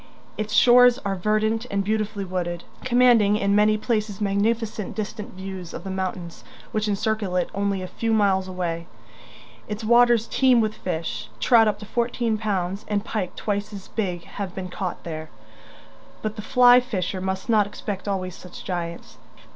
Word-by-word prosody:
Its 215 0 -4
shores 245 +2 +7
are 200 - 0
verdant 215 +4 0
and 200 0 0
beautifully 215 -1 -1
wooded, 175 -2 -3 0.2
commanding 240 -5 +4
in 200 -1 +1
many 210 +1 +4
places 215 -3 -1
magnificent 210 +1 -1
distant 215 -2 -5
views 190 -2 -7
of 170 - -7
the 195 - -5
mountains 185 -2 -4 0.3
which 215 0 -1
encircle 205 -2 -1
it 180 - 0
only 200 -1 -1
a - - -5
few 225 +4 -2
miles 195 -3 +2
away. 170 -2 -3 0.8
Its 210 +2 -5
waters 235 0 +5
teem 255 -1 +3
with 215 -1 +1
fish; 160 - -4
trout 225 - +5
up 210 -1 +1
to 210 - -9
fourteen 235 0 0
pounds 200 -2 -2
and 205 0 -1
pike 195 -5 -3
twice 205 0 -2
as 195 -2 -9
big 180 -6 -2
have 195 -1 -6
been 185 -1 -5
caught 180 0 -4
there 155 -2 -6 0.9
but 215 0 -2
the 215 - -5
flyfisher 245 -6 +4
must 190 0 -3
not 215 -3 +3
expect 200 -1 -6
always 185 -2 -2
such 180 -1 -11
giants. 170 -2 -5
205 Hz, 165 wpm, -24 LUFS, 185-220 Hz, 0.9 s, shores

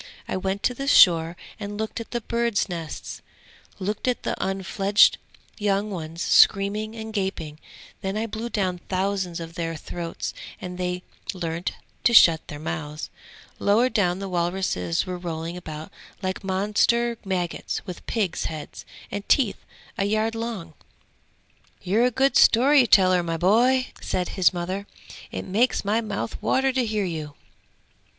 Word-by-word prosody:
I - - -2
went 190 +1 -2
to 250 - +2
the 275 +3 -5
shore 170 -8 +6 0.2
and 205 0 -5
looked 220 +1 -3
at 230 - -7
the 240 - -3
birds' 235 -1 0
nests, 165 -4 -6 0.6
looked 205 +5 -3
at 250 - 0
the - - -1
unfledged 195 +1 +3 0.4
young 205 0 0
ones 165 -1 -5
screaming 210 +2 +4
and 220 -1 -7
gaping; 170 -7 -3 0.4
then 195 +2 -2
I 220 - -1
blew 225 +1 -5
down 185 -5 -1
thousands 190 -2 -1
of 165 0 -7
their 165 -1 -3
throats 165 +2 -5 0.3
and 180 0 -7
they 180 0 -2 0.3
learnt 170 -1 -3 0.3
to 235 - +4
shut 165 -6 +7
their 145 - -7
mouths. 150 0 -5 0.5
Lower 225 +5 +3
down 180 -7 +1
the 195 0 -5
walruses 175 - -1
were 180 -1 -5
rolling 165 -1 -4
about 155 -3 -8 0.3
like 185 +2 -2
monster 210 +5 +1
maggots 180 -4 -3
with 180 - -8
pigs' 205 -7 -1
heads 155 -2 -7 0.2
and 205 0 -5
teeth 245 -8 +2 0.4
a 195 - +2
yard 215 +2 +1
long!' 225 -8 -5 1.1
'You're 215 +7 +3
a - - +4
good 265 +3 +2
story 260 +2 +6
teller, 185 -3 +5
my 165 -1 -2
boy!' 245 +9 +3
said 180 -1 -2
his 190 -2 +3
mother. 185 +3 -4 0.4
'It - - -5
makes 220 +4 +1
my 215 +3 +2
mouth 215 0 -4
water 265 0 +2
to 255 -3 +1
hear 215 -2 0
you!' 155 -4 -5
195 Hz, 150 wpm, -25 LUFS, 175-220 Hz, 1.1 s, shut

